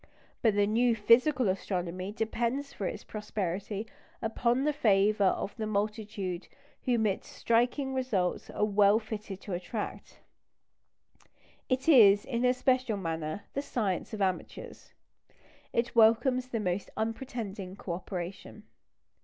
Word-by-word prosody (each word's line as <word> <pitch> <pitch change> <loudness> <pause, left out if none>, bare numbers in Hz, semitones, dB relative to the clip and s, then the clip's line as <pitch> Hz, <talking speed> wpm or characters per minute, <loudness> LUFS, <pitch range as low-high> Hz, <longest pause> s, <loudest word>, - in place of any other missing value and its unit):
But 220 -3 +3
the 205 0 +4
new 230 +3 +2
physical 245 +4 +4
astronomy 185 0 -2
depends 235 +5 -2
for 195 - -3
its - - -5
prosperity 205 0 -4 0.3
upon 235 +3 0
the 300 +1 +1
favour 210 -5 +3
of 195 +1 0
the 220 -2 -2
multitude 205 -3 -3 0.4
whom 235 -3 +2
its 195 -2 -1
striking 245 +4 +1
results 230 -9 -1
are 210 - 0
well 205 0 +4
fitted 215 -3 -6
to 200 - -6
attract. 185 +5 -5 1.5
It 255 +2 0
is, 205 -9 +7
in 240 -2 -2
a 250 - +5
special 255 -4 +1
manner, 165 0 -3
the 280 - -1
science 210 - -2
of 210 -3 -1
amateurs. 185 -1 -4 0.8
It 235 +1 -1
welcomes 245 +3 +4
the 235 -3 -2
most 185 -1 -2
unpretending 220 -5 -4
co 195 -3 -5
operation. 185 +3 -6
215 Hz, 130 wpm, -30 LUFS, 195-240 Hz, 1.5 s, is